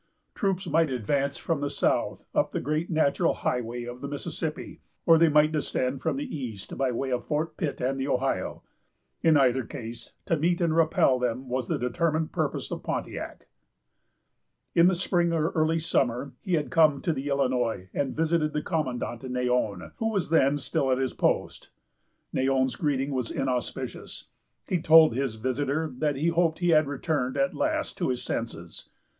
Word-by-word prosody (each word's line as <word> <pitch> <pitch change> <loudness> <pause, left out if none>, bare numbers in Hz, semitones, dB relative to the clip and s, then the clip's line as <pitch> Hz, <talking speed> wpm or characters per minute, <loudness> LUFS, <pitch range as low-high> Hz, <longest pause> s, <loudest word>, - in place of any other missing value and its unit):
Troops 195 -2 -1
might 165 -1 +2
advance 135 +3 -1
from 165 -4 -2
the 145 - -1
south - - 0
up - - +1
the - - 0
great 155 +4 -1
natural 155 -4 +2
highway 120 0 -2
of 120 +1 -8
the 140 - -4
Mississippi, 150 +2 -5 0.2
or 165 -1 +6
they 165 -1 +6
might 150 +1 +4
descend 135 -3 -1
from - - -1
the 280 -2 -4
east 115 -9 -6
by 135 -1 0
way 130 +2 -2
of 125 -1 -1
Fort 155 +1 -2
Pitt 150 -6 -3
and 135 +2 -1
the 135 - -1
Ohio. 135 -1 -1 0.6
In 160 -2 +5
either 130 -2 +3
case, 115 +1 -8
to 165 - +2
meet 170 +3 +1
and 165 -3 +1
repel 155 -5 +3
them 125 +1 -2
was 125 -1 -2
the - - 0
determined 155 +6 0
purpose - - -2
of - - -4
Pontiac. - - -5 1.3
In 170 +1 +6
the 185 - +3
spring, 175 -1 +1
or 160 0 +1
early 160 0 +1
summer, 135 -5 0
he 185 -5 0
had 150 -2 -2
come 155 -5 +4
to 165 - +1
the 135 0 -4
Illinois 125 -8 0
and 140 -2 -1
visited 160 -1 +1
the 150 0 -1
commandant, 125 -7 -2
Neyon, 125 -6 -1
who 225 - 0
was 195 -7 -1
then 145 -3 +4
still 135 0 0
at 130 - +3
his 130 -1 -1
post. - - -1 0.6
Neyon's 130 -1 +1
greeting 140 0 0
was 125 -4 -2
inauspicious. 125 -3 -3 0.4
He 180 -3 0
told 160 -4 +7
his 130 -2 -1
visitor 140 +6 -1
that 150 -2 +1
he 155 +5 +1
hoped 165 -1 +2
he 175 -1 0
had 155 -3 +5
returned 140 -2 -1
at 140 0 +1
last - - -1
to - - 0
his 125 -1 -2
senses. 85 -7 -5
140 Hz, 175 wpm, -27 LUFS, 125-160 Hz, 1.3 s, told